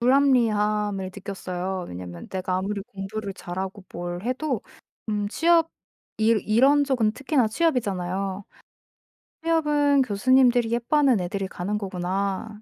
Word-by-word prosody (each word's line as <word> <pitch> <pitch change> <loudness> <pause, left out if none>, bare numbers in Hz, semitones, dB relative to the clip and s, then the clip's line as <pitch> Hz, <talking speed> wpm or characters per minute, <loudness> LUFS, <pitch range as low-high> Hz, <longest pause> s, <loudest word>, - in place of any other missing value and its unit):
불합리함을 215 -6 +2
느꼈어요. 190 -2 -4
왜냐하면 90 -1 -8
내가 185 -1 -2
아무리 200 +2 -2
공부를 200 +1 -6
잘하고 190 +2 -6
뭘 175 +1 -5
해도 255 +1 -2 0.5
음 205 -1 -1
취업 330 +5 +3 0.5
일 220 0 +3
이런 270 +7 +4
쪽은 240 -6 +1
특히나 275 -3 +1
취업이잖아요. 195 - -1 1.0
'취업은 295 -4 +3
교수님들이 245 +1 +3
예뻐하는 245 +1 +3
애들이 190 +2 -3
가는 195 +3 -3
거구나.' 195 +2 -3
210 Hz, 305 characters per minute, -25 LUFS, 190-255 Hz, 1.0 s, 이런